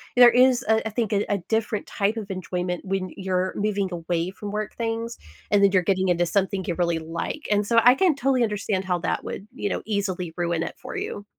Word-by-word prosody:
there 245 -1 +9
is, 250 0 +4
uh, 220 0 +3
I - - -1
think, 220 0 -1
a 205 0 +2
a 200 - +2
different 220 -2 0
type 210 +3 -1
of 205 -3 -5
enjoyment 180 -1 -3
when 190 -1 -2
you're 185 -1 -1
moving 200 -2 0
away 170 +1 -2
from 205 +1 -7
work 210 0 -3
things, 230 0 -3 0.3
and 205 -1 +4
then 200 - +6
you're 185 -2 +3
getting 190 +1 +1
into 175 -1 +2
something 190 +2 0
you 175 - -1
really 170 -2 +1
like, 165 - -5
and 205 0 +2
so 230 -1 +5
I 245 +1 +8
can 345 +1 +3
totally 265 -2 +2
understand 205 -3 -1
how 180 -1 +1
that - - -2
would, 200 - -6
you 205 -5 -3
know, - - -3
easily 190 -5 -2
ruin 170 -1 0
it - - -5
for - - -8
you. 205 - -5
200 Hz, 225 wpm, -24 LUFS, 180-220 Hz, 0.3 s, there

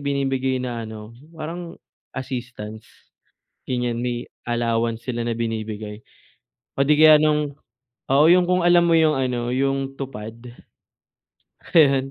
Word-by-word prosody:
binibigay 135 -2 -1
na 120 -3 -4
ano, 110 0 -9 0.2
parang 170 +2 -6 0.4
assistance, 120 -4 -6 0.8
ganiyan, 120 -2 -1
may 120 -1 -2 0.2
allowance 115 -1 -1
sila 120 -2 -3
na 115 - -1
binibigay 110 -2 -4 0.8
o 135 - +1
'di 150 +2 +3
kaya 155 -1 +8
no'ng 150 -2 +1 0.6
oo. 140 +3 +5
'Yong 175 +1 +5
kung 180 -1 +2
alam 175 0 +6
mo 165 -1 +4
'yong 155 -1 +4
ano, 125 -2 -1
'yong 135 0 -1
Tupad? 115 -5 -7 1.4
Ayun. 135 -3 +4
130 Hz, 125 wpm, -22 LUFS, 115-150 Hz, 1.4 s, kaya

